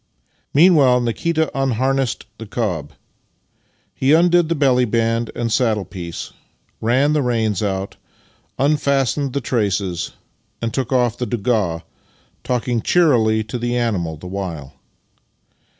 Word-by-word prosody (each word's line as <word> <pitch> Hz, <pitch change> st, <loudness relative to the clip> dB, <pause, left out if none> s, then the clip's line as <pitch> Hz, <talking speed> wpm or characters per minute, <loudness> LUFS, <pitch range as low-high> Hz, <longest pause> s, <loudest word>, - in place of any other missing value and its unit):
Meanwhile 145 Hz, -6 st, +5 dB
Nikita 160 Hz, +7 st, 0 dB
unharnessed 135 Hz, -1 st, 0 dB
the 115 Hz, -, -8 dB
cob. 90 Hz, -10 st, -3 dB, 1.0 s
He 135 Hz, +3 st, +2 dB
undid 175 Hz, 0 st, +4 dB
the 170 Hz, -, +1 dB
belly 130 Hz, -4 st, +3 dB
band 115 Hz, 0 st, 0 dB
and 115 Hz, -2 st, -1 dB
saddle 110 Hz, -5 st, +1 dB
piece, 85 Hz, -3 st, -7 dB, 0.5 s
ran 130 Hz, +6 st, +2 dB
the 150 Hz, -, +2 dB
reins 115 Hz, -6 st, 0 dB
out, 95 Hz, -1 st, -3 dB, 0.6 s
unfastened 140 Hz, -2 st, +1 dB
the 140 Hz, -, -1 dB
traces, 100 Hz, -6 st, -1 dB, 0.5 s
and 115 Hz, -1 st, -3 dB
took 130 Hz, -1 st, -2 dB
off 125 Hz, -3 st, +1 dB
the 125 Hz, -, -2 dB
doiiga, 105 Hz, -8 st, -1 dB, 0.6 s
talking 120 Hz, -1 st, -1 dB
cheerily 115 Hz, -11 st, +3 dB
to 110 Hz, +3 st, -5 dB
the 120 Hz, +1 st, -1 dB
animal 95 Hz, -10 st, -1 dB
the 80 Hz, -, -12 dB
while. 90 Hz, -7 st, -5 dB
120 Hz, 120 wpm, -20 LUFS, 105-135 Hz, 1.0 s, Meanwhile